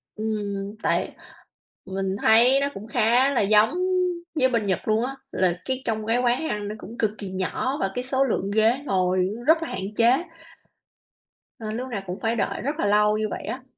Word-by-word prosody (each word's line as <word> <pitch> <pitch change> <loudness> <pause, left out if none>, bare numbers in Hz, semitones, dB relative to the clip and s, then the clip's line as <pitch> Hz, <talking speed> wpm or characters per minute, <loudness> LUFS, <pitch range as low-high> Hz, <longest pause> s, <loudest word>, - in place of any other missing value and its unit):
Ừm. 205 -2 -3
Tại - - 0 0.7
mình 190 0 -2
thấy 240 +5 +5
nó 280 - +1
cũng 210 +3 -9
khá 240 +5 +3
là 245 - +2
giống 210 +2 +4 0.7
với 260 0 +4
bên 230 -4 0
Nhật 190 +1 -2
luôn 220 +3 +2
á, 270 +1 -5 0.2
là 180 -1 0
cái 260 0 -2
trong 220 -2 -2
cái 230 +2 +1
quán 250 +6 +1
ăn 205 -1 -3
nó 210 - -5
cũng 230 +2 -10
cực 215 -2 +1
kỳ 200 -2 -6
nhỏ 225 +9 -2
và 195 - -1
cái 250 - -2
số 265 +1 +2
lượng 200 -6 -1
ghế 220 +4 +3
ngồi 185 -2 +1 0.2
rất 320 +1 +5
là - - -5
hạn 195 +3 -5
chế 240 +8 +4 1.4
nên 220 0 -4
lúc 255 +1 -4
nào 215 -5 -3
cũng 180 +2 -5
phải 225 +1 0
đợi 210 - -2
rất 285 +4 -2
là - - +1
lâu 210 +1 +3
như 215 - -1
vậy - - -5
á. 255 +1 -5
220 Hz, 205 wpm, -24 LUFS, 200-250 Hz, 1.4 s, thấy